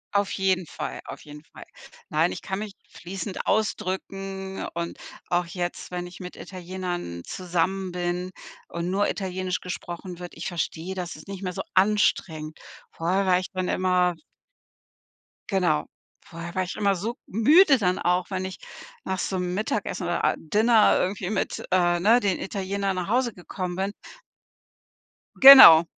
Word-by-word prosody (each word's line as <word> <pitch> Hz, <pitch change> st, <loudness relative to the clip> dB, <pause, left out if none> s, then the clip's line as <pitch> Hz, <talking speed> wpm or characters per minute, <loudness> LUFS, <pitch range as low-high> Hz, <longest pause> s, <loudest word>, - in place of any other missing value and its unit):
Auf 200 Hz, -1 st, +2 dB
jeden 185 Hz, -3 st, 0 dB
Fall, -, -, -6 dB
auf -, -, -9 dB
jeden 150 Hz, 0 st, -12 dB
Fall. -, -, -13 dB, 0.5 s
Nein, -, -, +2 dB
ich -, -, -7 dB
kann 190 Hz, +1 st, -3 dB
mich 210 Hz, -2 st, -6 dB
fließend 190 Hz, +2 st, -6 dB
ausdrücken 195 Hz, -2 st, -2 dB
und 170 Hz, 0 st, -4 dB, 0.3 s
auch 175 Hz, -1 st, +1 dB
jetzt, 175 Hz, 0 st, -4 dB
wenn 180 Hz, 0 st, -4 dB
ich 175 Hz, -1 st, -11 dB
mit 180 Hz, -1 st, -8 dB
Italienern 180 Hz, -, -6 dB
zusammen 185 Hz, +1 st, -2 dB
bin 180 Hz, +1 st, -2 dB, 0.4 s
und 170 Hz, +1 st, -3 dB
nur 205 Hz, +1 st, +1 dB
Italienisch 185 Hz, -1 st, -3 dB
gesprochen 180 Hz, 0 st, -7 dB
wird, 175 Hz, -1 st, -9 dB
ich 165 Hz, -, -5 dB
verstehe 175 Hz, +1 st, -3 dB
das, 180 Hz, -2 st, -5 dB
dass -, -, -12 dB
ist -, -, -23 dB
nicht 195 Hz, -1 st, -7 dB
mehr 180 Hz, -, -2 dB
so -, -, -4 dB
anstrengend. 185 Hz, -6 st, +1 dB, 0.3 s
Vorher 185 Hz, +4 st, 0 dB
war 180 Hz, -1 st, +4 dB
echt 185 Hz, 0 st, -6 dB
dann 185 Hz, -1 st, -1 dB
immer 180 Hz, -1 st, +2 dB, 1.3 s
Genau. 180 Hz, -, +1 dB, 0.4 s
Vorher 170 Hz, +2 st, -8 dB
war 185 Hz, -, +1 dB
ich 180 Hz, -, -6 dB
immer 200 Hz, -1 st, +2 dB
so 225 Hz, +7 st, -4 dB
müde 280 Hz, -, +5 dB
dann 185 Hz, -3 st, 0 dB
auch, 180 Hz, +2 st, 0 dB
wenn 185 Hz, 0 st, -2 dB
ich 190 Hz, -, -6 dB, 0.5 s
nach 190 Hz, 0 st, -3 dB
so 190 Hz, -, -2 dB
'nem 180 Hz, 0 st, -2 dB
Mittagessen 210 Hz, -2 st, -2 dB
oder, 175 Hz, 0 st, -1 dB
a -, -, +3 dB
Dinner 215 Hz, +6 st, +4 dB
irgendwie 185 Hz, 0 st, -1 dB
mit, 215 Hz, -, -2 dB
äh, 175 Hz, -1 st, +3 dB
ne, 225 Hz, +6 st, +5 dB
den 195 Hz, -2 st, 0 dB
Italienern 195 Hz, 0 st, -2 dB
nach 180 Hz, +1 st, -3 dB
Hause 245 Hz, -1 st, +1 dB
gekommen 180 Hz, 0 st, -5 dB
bin 195 Hz, +2 st, -2 dB, 1.4 s
Genau. 265 Hz, -12 st, +11 dB
185 Hz, 160 wpm, -25 LUFS, 175-195 Hz, 1.4 s, Genau